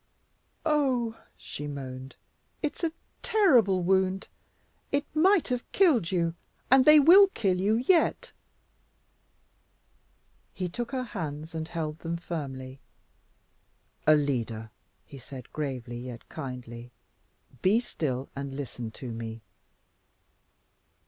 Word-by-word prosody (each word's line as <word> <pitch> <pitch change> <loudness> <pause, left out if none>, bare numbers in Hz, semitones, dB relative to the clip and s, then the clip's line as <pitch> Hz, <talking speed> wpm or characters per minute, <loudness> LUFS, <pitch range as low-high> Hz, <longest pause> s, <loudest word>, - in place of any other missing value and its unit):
"Oh, 265 -7 +1
oh!" - - -23 0.2
she 145 - -7
moaned, 135 -2 -7 0.5
"It's 300 +3 -3
a 330 - +1 0.3
terrible 240 - +4
wound; 190 +1 +1 0.6
it 285 +1 +1
might 360 +2 +4
have 250 -1 -3
killed 290 - +4
you, 170 -3 +1 0.4
and 265 -1 +7
they 305 0 +9
WILL 365 +7 +8
kill 190 -4 +1
you 210 +3 +3
yet." 335 - +2 2.2
He 185 - -2
took 235 +7 -4
her 260 -2 -1
hands 160 -8 -6
and 160 -1 -4
held 160 -2 -4
them 170 0 -3
firmly. 135 -6 -6 1.3
"Alida," 120 -7 +1 0.3
he 140 - -11
said, 130 -1 -11
gravely 125 -5 -4
yet 120 -1 -8
kindly, 125 -4 -7 0.7
"be 200 +5 +4
still 135 - -3
and 140 -1 -5
listen 125 -4 -5
to 120 +2 -8
me." 115 0 -6
165 Hz, 110 wpm, -28 LUFS, -, 2.2 s, they